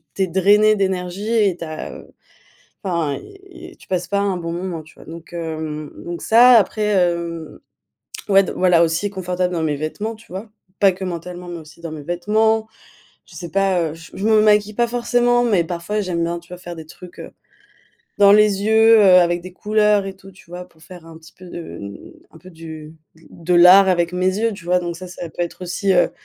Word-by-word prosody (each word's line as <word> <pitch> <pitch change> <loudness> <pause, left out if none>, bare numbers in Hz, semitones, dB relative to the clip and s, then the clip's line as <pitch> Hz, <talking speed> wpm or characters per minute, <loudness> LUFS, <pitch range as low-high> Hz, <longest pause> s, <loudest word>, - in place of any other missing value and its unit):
tu 195 - -1
es - - +2
drainé 205 +4 +4
d'énergie 190 +1 -2
et 205 -6 +2
tu - - -6
as 155 0 -7
heu - - -13 0.8
enfin 170 -7 -1
y 390 -1 -14
y - - -24
tu - - -19
passes 180 -1 -2
pas 200 -1 0
un 200 -2 -1
bon 170 -1 -5
moment, 175 -2 -5
tu 155 - -19
vois? - - -16
Donc, 165 +1 -11
hem 155 -2 -5
donc 175 0 -6
ça, 240 +3 +6
après, 215 +2 -2
hem, 170 -5 -1 0.7
ouais 195 0 +6
d - - -5
voilà 180 -2 +4
aussi 170 +5 -1
confortable 180 -1 -2
dans 165 - -2
mes 150 -2 0
vêtements, 205 +9 -4
tu 220 - -19
vois? 200 +4 -7 0.3
Pas 195 -2 +5
que 190 - -8
mentalement, 175 0 -7
mais 170 -1 -6
aussi 155 +1 -16
dans 165 -2 -7
mes 150 -2 -8
vêtements. 215 +6 0 0.6
Je - - -17
sais 170 -3 -7
pas, 195 -1 +1
heu, - - -9
je 165 +4 -9
me 220 -1 +4
maquille 210 0 +3
pas 240 +1 +1
forcément, 245 0 +1
mais 200 -8 +2
parfois 175 +5 -3
j'aime 180 -4 -2
bien, 170 +1 -3
tu 170 - -23
vois, 180 - -9
faire 175 -1 -9
des 160 -1 -10
trucs, 180 +2 -14
heu, - - -9 0.9
dans 200 -1 +7
les 205 -1 +4
yeux, 220 +1 +5
heu, 205 - +5 0.2
avec 175 0 +1
des 185 - -10
couleurs 210 -1 +1
et 195 - -5
tout, 195 0 -15
tu 180 -2 -20
vois? 180 +1 -8
Pour 160 -2 -25
faire 175 -2 -13
un 165 -1 -12
petit 160 -1 -17
peu 185 - -14
de 170 -1 -9
mmh, 100 0 -8 0.3
un - - -16
peu 185 - -15
du 160 -2 -10 0.4
de 175 +2 -2
l'art 185 +3 +7
avec 175 -1 +1
mes 185 +2 0
yeux, 225 +1 0
tu 185 - -13
vois? 180 0 +2
Donc 170 -1 -5
ça, 185 - -9
ça 175 -1 -8
peut - - -9
être 175 +1 -6
aussi, 180 +2 -1
heu, 175 - +3
180 Hz, 220 wpm, -20 LUFS, 170-205 Hz, 0.9 s, dans